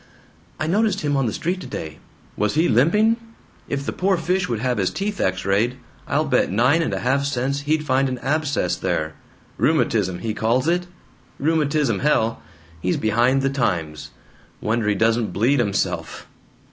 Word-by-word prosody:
"I 155 - -1
noticed 200 +3 +1
him 145 -2 0
on 135 -3 +1
the - - -1
street 180 - -2
today." 80 - -7 0.4
"Was 105 +6 0
he 160 +3 +3
limping? 210 - +3 0.5
If 140 0 -2
the - - -1
poor 190 0 +1
fish 180 +1 0
would 120 - 0
have 125 0 -1
his 95 - +1
teeth 200 0 -3
X 95 0 0
rayed, 110 +6 +1 0.3
I'll - - +1
bet - - +2
nine 125 - +3
and 165 - -1
a - - -2
half 135 +3 +1
cents 140 0 -1
he'd 155 0 +1
find 135 -1 +2
an 130 - -3
abscess 145 +2 0
there. 80 0 -2 0.5
'Rheumatism' 90 -1 +1
he 110 - -1
calls 115 +6 +1
it. 175 +1 +1 0.5
Rheumatism, 150 -7 +1
hell! 115 -6 +1 0.4
He's 90 - 0
behind 120 +5 +2
the 135 - +1
times. 85 - -2 0.5
Wonder 110 0 -1
he 105 - +2
doesn't 110 -1 +1
bleed 125 +9 +2
himself! 100 -4 -2
130 Hz, 170 wpm, -22 LUFS, 110-155 Hz, 0.5 s, he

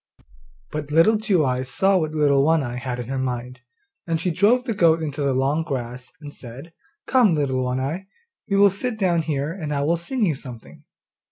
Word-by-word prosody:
But 150 -1 -5
Little 165 +9 +4
Two 195 -8 +2
eyes 130 0 -1
saw 195 +6 +2
what 155 -2 -2
Little 140 -2 +3
One 160 0 +3
eye 120 -1 -4
had 125 -1 -4
in 120 -2 -6
her 135 +1 -3
mind, 125 -1 -4 0.5
and 165 -1 0
she 180 +2 -1
drove 210 +9 +3
the 240 -3 -2
goat 165 -5 +4
into 150 -2 -4
the 140 -2 +1
long 135 +4 +1
grass 125 -5 -5
and 145 -2 -10
said, 135 +7 -11 0.3
'Come, 240 -10 +4
Little 130 -3 0
One 125 +1 -1
eye, 160 +9 -4 0.4
we 200 - +2
will 200 0 +6
sit 220 +4 -3
down 180 -5 +2
here, 150 -1 -2
and 160 -5 -5
I 140 -1 0
will 165 +4 +1
sing 220 +7 -1
you 165 - +1
something. 125 -4 -11
150 Hz, 205 wpm, -22 LUFS, 130-180 Hz, 0.5 s, will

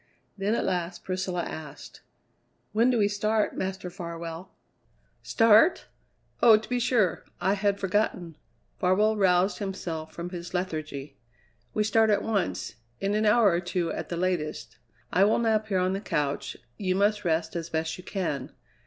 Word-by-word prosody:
Then 205 +2 0
at - - -1
last 175 -1 -2
Priscilla 185 -1 -2
asked: 155 -3 -9 0.7
"When 230 +4 +3
do 250 - +2
we 205 -2 +3
start, 210 +1 0
Master 185 -1 -4
Farwell?" 170 -1 -7 0.7
"Start? 225 - +4 0.6
Oh, 225 -2 +8
to 215 - -8
be 250 0 0
sure. 230 -8 +1 0.2
I 190 +3 +2
had 200 0 0
forgotten." 185 -4 -1 0.4
Farwell 210 +4 +3
roused 190 -1 +2
himself 170 -6 -4
from 175 +2 -6
his 175 0 -6
lethargy. 155 -5 -4 0.6
"We 215 - +2
start 220 +1 +3
at 205 - +2
once; 110 - -2 0.2
in 195 +1 0
an 215 +1 +2
hour 210 -2 +5
or 170 - +1
two 175 -1 -2
at - - -5
the 170 - -3
latest. 175 -4 -2 0.3
I 185 - +5
will 210 +2 +4
nap 220 -2 +1
here 195 -3 0
on 185 +1 +1
the 195 - -3
couch; 145 -7 -2 0.2
you 185 -2 0
must 205 +2 +2
rest 165 -1 0
as 170 -1 -4
best 160 0 -2
you - - -10
can. 165 -11 -3
185 Hz, 160 wpm, -27 LUFS, 170-210 Hz, 0.7 s, Oh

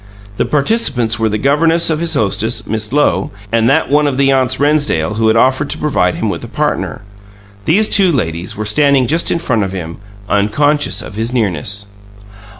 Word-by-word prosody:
The - - +1
participants 140 - 0
were 110 0 +1
the 105 - -1
governess 160 +7 +2
of 155 - -1
his 165 -1 -1
hostess, 110 0 -1
Miss 110 0 -4
Lowe, 130 -10 +1 0.2
and 115 +1 +2
that 135 - +1
one 150 0 +3
of 135 -2 -2
the 135 0 +3
aunts 130 -1 +1
Rennsdale 145 - +1
who 110 0 +2
had 110 - +3
offered 130 +4 +2
to - - -1
provide 90 -12 0
him - - -2
with - - -4
a - - -7
partner. - - -2 0.6
These 210 +7 +3
two 195 -4 +4
ladies 90 - -3
were 110 - -3
standing 140 +4 +3
just 165 +7 +1
in - - +1
front 130 -10 -1
of 95 -1 -4
him, 85 -3 -6 0.3
unconscious 145 +10 +1
of - - -9
his 110 +3 -3
nearness. 100 - -1
130 Hz, 190 wpm, -14 LUFS, 105-150 Hz, 0.6 s, two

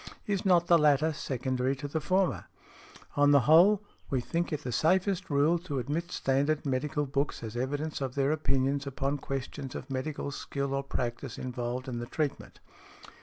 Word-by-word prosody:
Is 200 -4 -1
not 175 -2 +5
the 170 -1 +5
latter 150 +1 +4
secondary 130 -1 -1
to 140 +2 -6
the 155 +2 -2
former? 185 +3 +1 0.7
On 145 0 +5
the 140 -1 +6
whole, 175 +9 +6 0.3
we 135 - +1
think 170 +8 -2
it 150 -1 -3
the 125 - -3
safest 185 - +1
rule 150 +4 +3
to 165 -5 -5
admit 150 +7 -2
standard 140 +3 +1
medical 145 +2 0
books 140 -1 -2
as 110 0 -6
evidence 145 +5 -2
of 130 -2 -3
their 140 0 +2
opinions 140 -2 0
upon 140 +1 -2
questions 135 0 -5
of 135 - -7
medical 140 +2 -3
skill 140 -1 -3
or 135 - 0
practice 125 -1 -4
involved 125 +1 -4
in 120 -2 -3
the 120 - -5
treatment." 120 - -3
140 Hz, 170 wpm, -30 LUFS, 130-155 Hz, 0.7 s, the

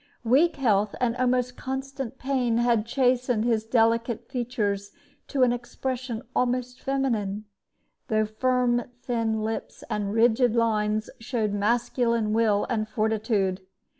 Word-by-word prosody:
Weak 275 +9 +4
health 210 -7 +1
and 245 -2 +1
almost 250 0 +1
constant 265 -1 -5
pain 255 -4 0
had 235 -2 +2
chastened 250 -3 +1
his 225 -3 +1
delicate 230 0 +1
features 205 -5 -2 0.3
to 270 -2 +1
an 245 -1 +4
expression 245 0 -4
almost 250 0 -1
feminine, 220 -7 -1 0.6
though 215 -2 +2
firm 245 +2 +1 0.2
thin 225 -3 -1
lips 220 +1 -4
and 205 -1 -1
rigid 230 +1 +3
lines 215 -2 +1
showed 225 -3 -1
masculine 230 +1 +1
will 215 -2 +2
and 215 -3 -1
fortitude. 215 -4 0
235 Hz, 120 wpm, -26 LUFS, 215-250 Hz, 0.6 s, Weak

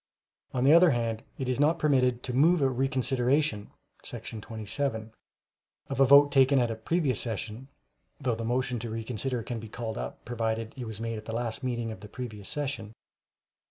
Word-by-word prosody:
On 125 - -1
the 140 +3 +7
other 170 +1 +8
hand, 115 -4 -1 0.2
it 130 - -3
is 130 +1 0
not 155 +4 +4
permitted 125 -5 +2
to 125 - -3
move 155 +4 +4
a 135 - +4
reconsideration 130 -1 +1 0.3
[§ 110 - -6
27] 110 +1 -3 0.8
of - - -2
a 135 - +7
vote 140 +2 +7
taken 135 0 +5
at 120 -3 +2
a - - -3
previous 140 +4 0
session 115 +2 -5 0.5
[though 130 -4 0
the 115 +1 -4
motion 125 +1 0
to 115 +1 -5
reconsider 115 +2 -3
can 120 0 -4
be 110 0 -9
called 115 0 -5
up, - - -6
provided 115 -1 -2
it 125 -3 -6
was 110 -1 -7
made 115 -1 -3
at 110 - -13
the 110 - -5
last 115 -1 -3
meeting 120 -3 -2
of 110 - -8
the 105 +1 -11
previous 110 -5 -7
session. 135 -7 -3
120 Hz, 190 wpm, -28 LUFS, 115-135 Hz, 0.8 s, other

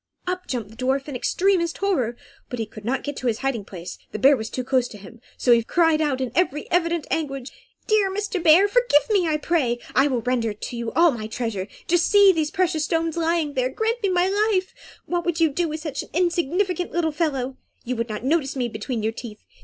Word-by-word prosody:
Up 365 0 -3
jumped 230 -5 -4
the - - -14
dwarf 265 +3 -1
in 285 - -5
extremest 350 +5 +1
terror, 260 - 0 0.3
but 225 -3 -4
could 215 - -10
not 250 +4 -1
get 290 -1 -4
to 255 - -3
his 225 -2 +1
hiding 245 -6 -1
place, 180 -2 -9
the - - -4
bear 275 +7 +6
was 220 -3 -5
too 255 - -3
close 255 -1 +1
to 210 - -11
him; 210 +4 -13 0.2
so 245 - +2
he 235 -1 +6
cried 325 +3 +2
out 290 -4 0
in 260 -3 -2
very 300 -1 0
evident 340 -2 +1
anguish 275 -4 -2 0.4
"Dear 425 -2 +3
Mr. 410 0 -2
Bear, 335 +4 +6
forgive 480 -9 +3
me, 385 -5 +3
I 310 -1 +1
pray! 295 -7 0 0.2
I 270 +2 +4
will 255 -4 -1
render 235 -2 0
to 230 - -6
you 235 -1 -3
all 335 0 +5
my 220 -4 -5
treasure. 220 -4 -3 0.2
Just 345 0 +3
see 405 -1 +7
those 315 -4 0
precious 330 -3 0
stones 330 -1 0
lying 330 -3 0
there! 255 -1 0
Grant 450 - -1
me 400 - +1
my 360 0 +2
life! 400 -1 +1 0.3
What 350 0 -1
would 345 -1 -1
you 325 -1 +4
do 335 +4 -1
with 310 +1 -5
such 300 -4 -4
an - - -12
insignificant 355 +1 0
little 330 -1 0
fellow? 275 -5 -2 0.3
You 250 +1 -2
would 230 0 -2
not 215 +1 -5
notice 285 0 +1
me 245 -3 -1
between 220 +1 -4
your 220 +1 0
teeth. 225 -3 -9
295 Hz, 225 wpm, -23 LUFS, 245-345 Hz, 0.4 s, see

